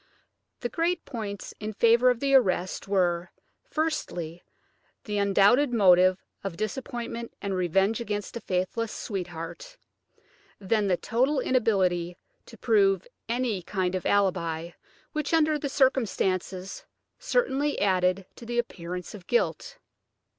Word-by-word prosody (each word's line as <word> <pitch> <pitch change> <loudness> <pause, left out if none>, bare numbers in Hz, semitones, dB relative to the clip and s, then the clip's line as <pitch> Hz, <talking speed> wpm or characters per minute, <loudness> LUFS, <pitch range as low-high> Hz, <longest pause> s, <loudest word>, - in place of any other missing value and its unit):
The 240 - -1
great 335 +5 -1
points 210 -5 -6
in 215 0 -4
favour 235 +3 +5
of 245 -2 +1
the 275 0 +1
arrest 185 -8 +2
were, 180 -3 +1 0.4
firstly, 175 - -2 0.6
the 210 -1 -2
undoubted 200 +7 +4
motive 185 -4 +5 0.3
of 190 -4 -5
disappointment 235 +1 -4
and 200 -1 -3
revenge 195 +5 +1
against 205 -2 -4
a 235 - -5
faithless 190 +5 -2
sweetheart, 190 - -6 0.8
then 205 +1 +1
the 180 -2 +2
total 260 +8 +1
inability 185 -9 +1 0.3
to - - -13
prove 395 -1 +3 0.2
any 235 -5 0
kind 185 0 -2
of 185 - -2
alibi, 170 -4 +1 0.4
which, 305 +1 0
under 310 -1 +3
the 285 - -3
circumstances, 195 -8 0 0.4
certainly 295 - 0
added 185 -1 +2
to 235 - -10
the 240 0 -3
appearance 180 -6 -4
of 190 -4 -11
guilt. 370 - 0
205 Hz, 125 wpm, -27 LUFS, 185-255 Hz, 0.8 s, favour